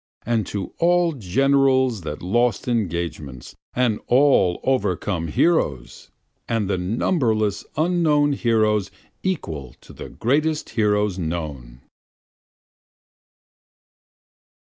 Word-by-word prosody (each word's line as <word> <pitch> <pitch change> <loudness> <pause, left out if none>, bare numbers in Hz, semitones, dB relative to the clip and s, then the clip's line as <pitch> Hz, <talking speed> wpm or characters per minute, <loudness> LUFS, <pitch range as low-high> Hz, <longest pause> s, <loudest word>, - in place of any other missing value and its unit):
And 115 -4 0
to 100 -2 -5
all 175 0 +3
generals 130 +1 +2
that 75 -1 -6
lost 120 +5 0
engagements, 85 - -3 0.2
and 125 -4 +1
all 125 -9 +3
overcome 90 -9 -1
heroes! 75 - 0 0.4
And 115 -4 0
the 95 -2 -1
numberless 110 - 0
unknown 155 -3 +2
heroes 110 -5 +1 0.3
equal 80 - -4
to - - -15
the - - -9
greatest 150 +6 0
heroes 105 -3 +1
known! 75 -8 -5
110 Hz, 90 wpm, -22 LUFS, 90-135 Hz, 0.4 s, all